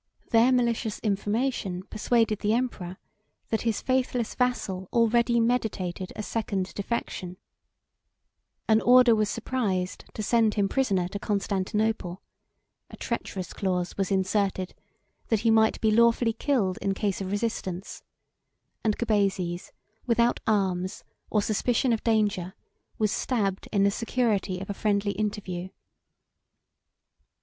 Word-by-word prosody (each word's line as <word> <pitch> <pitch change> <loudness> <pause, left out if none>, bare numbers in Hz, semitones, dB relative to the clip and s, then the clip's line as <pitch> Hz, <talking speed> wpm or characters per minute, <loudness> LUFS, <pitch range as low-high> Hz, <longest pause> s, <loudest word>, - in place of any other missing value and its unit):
Their 230 +3 +5
malicious 235 -3 +1
information 205 -2 -1
persuaded 220 +1 +1
the 210 +1 +1
emperor 210 -7 -2 0.5
that 220 - 0
his 225 -2 -1
faithless 255 -3 0
vassal 200 -7 -1
already 235 0 +3
meditated 210 -6 -1
a 215 - -4
second 200 -4 -2
defection: 195 -4 -4 1.3
an 220 0 +4
order 250 -1 +7
was 215 -2 +1
surprised 205 -7 -2
to 215 - -3
send 225 -1 +3
him 200 -2 +2
prisoner 195 -8 +1
to 200 - -5
Constantinople; 200 -1 -1 0.7
a - - -11
treacherous 185 -3 -4
clause 180 -2 -1
was 195 -2 -1
inserted, 190 -1 0 0.5
that 225 -3 +1
he 225 0 +3
might 220 0 +4
be 220 - +3
lawfully 235 +1 +4
killed 220 -7 0
in 195 -1 0
case 200 -1 -1
of 190 - -3
resistance; 200 -3 -3 0.8
and 215 -2 +1
Gubazes, 195 -6 0 0.4
without 235 0 +3
arms, 190 -4 0 0.3
or 210 -2 +2
suspicion 235 +4 +1
of 225 - -2
danger, 205 -5 +1 0.4
was 215 -2 +1
stabbed 200 -7 -1
in 200 -2 +3
the 200 - +4
security 215 -5 0
of 195 - -6
a 200 - -3
friendly 200 -1 0
interview. 200 -4 -3
210 Hz, 125 wpm, -27 LUFS, 190-230 Hz, 1.3 s, order